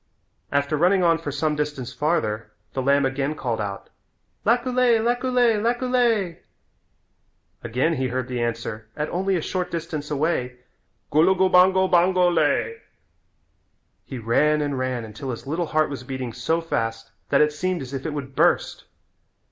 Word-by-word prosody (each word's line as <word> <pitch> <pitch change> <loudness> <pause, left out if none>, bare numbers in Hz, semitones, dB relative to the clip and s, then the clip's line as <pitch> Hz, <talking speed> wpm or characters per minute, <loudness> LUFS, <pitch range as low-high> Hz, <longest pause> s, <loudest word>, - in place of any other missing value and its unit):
After 140 +1 +1
running 180 +4 +3
on 165 -1 +3
for 150 -3 -5
some 150 +2 0
distance 145 -4 -3
farther 115 -7 -1 0.2
the 135 - -1
lamb 140 +1 +3
again 135 +3 -1
called 120 -6 -2
out, 100 -1 -6 0.6
"Laculay, 245 0 +3
laculay, 240 -1 +2
laculay." 235 -6 +1 1.2
Again 125 +8 0
he 130 -4 -1
heard 130 0 -3
the 125 -2 -3
answer 115 -2 -3
at 150 0 -2
only 190 +2 0
a 165 - -1
short 180 -1 -2
distance 160 -3 -4
away, 140 -4 -1 0.5
"Gulugubango, 185 +3 +4
bango 180 0 +4
lay." 455 - +1 1.3
He 130 - -7
ran 145 +7 +2
and 145 -2 -1
ran 130 -3 -2
until 110 +5 -7
his 120 +1 -5
little 165 +4 -2
heart 155 -1 +1
was 135 -3 -5
beating 130 -2 -5
so 160 +8 -1
fast 115 -7 -3 0.2
that 140 - +4
it 150 0 +3
seemed 180 0 -2
as 130 +1 -9
if 135 -1 -4
it 155 - -3
would 140 -2 -6
burst. - - +1
150 Hz, 150 wpm, -23 LUFS, 130-180 Hz, 1.3 s, Gulugubango